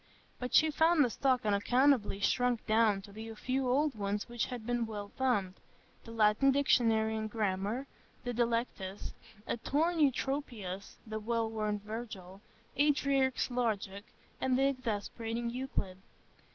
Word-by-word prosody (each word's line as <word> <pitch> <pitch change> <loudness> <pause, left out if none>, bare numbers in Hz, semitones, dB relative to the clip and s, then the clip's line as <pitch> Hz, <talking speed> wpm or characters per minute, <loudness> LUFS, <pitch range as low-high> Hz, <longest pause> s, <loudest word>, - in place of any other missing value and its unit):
But 250 0 -2
she 315 0 +6
found 320 -1 +4
the 240 - -2
stock 255 -2 +1
unaccountably 220 +1 +3
shrunk 245 +3 +1
down 215 -3 +3
to 205 - -12
the 220 +2 -8
few 255 +3 -1
old 290 +3 +2
ones 205 -1 -2
which 240 -1 -2
had 245 -3 -6
been 240 -1 0
well 205 -2 -6
thumbed,—the 220 -3 -4
Latin 220 +4 +4
Dictionary 230 -5 +3
and 215 0 -3
Grammar, 210 +3 -1 0.4
a 245 - -2
Delectus, 230 -5 -2 0.3
a - - -2
torn 320 +8 0
Eutropius, 250 -9 -1
the 220 -1 -4
well 230 +1 0
worn 215 -1 -1
Virgil, 205 -3 -8 0.4
Aldrich's 275 -3 +2
Logic, 210 -5 -1 0.4
and 255 -1 +2
the 270 - +3
exasperating 235 -1 -3
Euclid. 235 -7 -3
230 Hz, 135 wpm, -32 LUFS, 210-260 Hz, 0.4 s, she